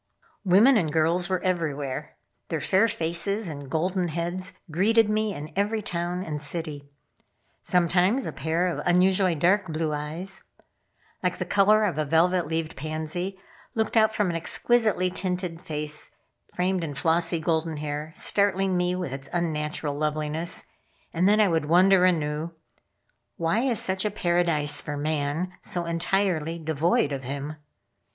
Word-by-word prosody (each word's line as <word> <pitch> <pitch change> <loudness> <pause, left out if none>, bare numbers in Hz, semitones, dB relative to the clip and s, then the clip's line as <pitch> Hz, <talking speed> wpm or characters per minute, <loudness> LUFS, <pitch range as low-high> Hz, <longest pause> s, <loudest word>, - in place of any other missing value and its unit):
Women 215 +7 +6
and 165 -7 0
girls 165 +3 +2
were 185 -1 -1
everywhere. 150 -7 -2 0.3
Their - - -2
fair 195 +4 +3
faces 195 +3 0
and 145 -4 -7
golden 180 +4 0
heads 175 +3 -3 0.2
greeted 220 +7 +3
me 215 0 0
in 150 -5 -7
every 210 +2 0
town 175 0 -3
and 150 -4 -4
city. 150 -2 -4 0.7
Sometimes 180 +7 +2
a - - -3
pair 160 +5 -1
of 180 - -2
unusually 185 0 +3
dark 185 +5 +2
blue 155 -1 -2
eyes, 160 +6 -3 0.8
like - - -1
the - - -3
color 210 +2 +4
of 180 -7 0
a - - +2
velvet 170 +3 +2
leaved 160 0 -3
pansy, 155 +5 -4 0.4
looked 220 0 -1
out 220 0 +4
from 200 -4 +1
an - - -4
exquisitely 195 +2 +1
tinted 180 -2 -3
face 150 0 -2 0.4
framed 180 0 -1
in 145 -3 -4
flossy 165 +3 +1
golden 160 0 -1
hair, 150 +1 -4
startling 195 -2 +1
me 180 0 +1
with 180 -7 -4
its 135 0 -7
unnatural 155 -3 -2
loveliness, 155 +3 -1 0.5
and 180 +4 +3
then 210 +1 +4
I 210 - +5
would 165 -4 0
wonder 180 +3 +5
anew: 160 -1 0 0.8
"Why 165 +6 +1
is 245 -3 +2
such 190 0 +1
a 210 - +1
paradise 175 -6 +1
for 145 -1 -5
man 155 +4 -2
so 175 -1 -1
entirely 170 -1 0
devoid 160 -1 +1
of 135 -1 -4
him?" 140 +4 -5
170 Hz, 150 wpm, -26 LUFS, 155-190 Hz, 0.8 s, Women